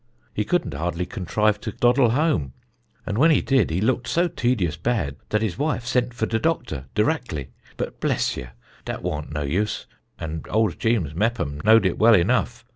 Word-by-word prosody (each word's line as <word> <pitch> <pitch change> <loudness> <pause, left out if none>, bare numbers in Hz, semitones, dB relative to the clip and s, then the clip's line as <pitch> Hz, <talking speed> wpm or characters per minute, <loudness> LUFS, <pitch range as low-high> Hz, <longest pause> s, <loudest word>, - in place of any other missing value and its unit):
He 105 - 0
could'nt 175 - 0
hardly 85 +4 -2
contrive 105 +3 0
to 110 - -4
doddle 120 +3 +3
home, 125 - +1 0.5
and 105 - -2
when 160 +4 +6
he 155 - +5
did 135 - +2
he 80 +3 -1
looked 125 +2 0
so 170 +8 +2
tedious 120 - 0
bad 85 - -1
dat 105 +1 +1
his 110 +1 -2
wife 145 -5 -1
sent 125 -1 0
for 130 - 0
de 115 - -1
doctor 125 - -1
dirackly. 105 - -1 0.3
But - - -4
bless - - 0
ye, 65 - -6 0.4
dat - - -5
waunt 75 0 -3
no 75 -1 -2
use; 90 +10 -1 0.3
and 80 0 -6
old 110 -4 +1
Jeems 110 -11 0
Meppom 80 -7 -1
knowed 110 -1 +6
it 90 - 0
well 115 +1 +7
enough. 115 +5 +1
110 Hz, 185 wpm, -23 LUFS, 85-125 Hz, 0.5 s, well